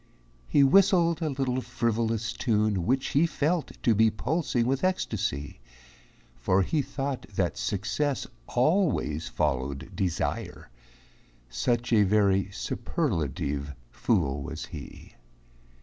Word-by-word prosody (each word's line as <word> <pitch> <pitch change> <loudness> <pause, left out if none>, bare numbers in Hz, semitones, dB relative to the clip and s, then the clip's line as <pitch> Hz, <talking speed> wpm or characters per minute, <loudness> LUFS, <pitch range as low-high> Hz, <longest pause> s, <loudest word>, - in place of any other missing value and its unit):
He 140 - +4
whistled 170 +2 +4
a 160 - 0
little 130 -2 -1
frivolous 115 -2 -1
tune 105 -6 0
Which 130 +2 +1
he 155 +5 +3
felt 160 +1 -1
to 115 - +4
be 110 +1 +4
pulsing 125 +2 -1
with 135 +2 0
ecstasy, 105 - -1 0.8
For 95 +11 +2
he 150 - 0
thought 135 0 -4
that 90 -2 0
success 115 +8 -1 0.2
always 130 - +1
followed 70 -2 -2
desire, 90 -8 -3 0.8
Such 120 - 0
a 110 - +6
very 100 -1 +3
superlative 75 - -2 0.2
fool 75 - 0
was - - -6
he. - - -10
115 Hz, 110 wpm, -27 LUFS, 95-140 Hz, 0.8 s, a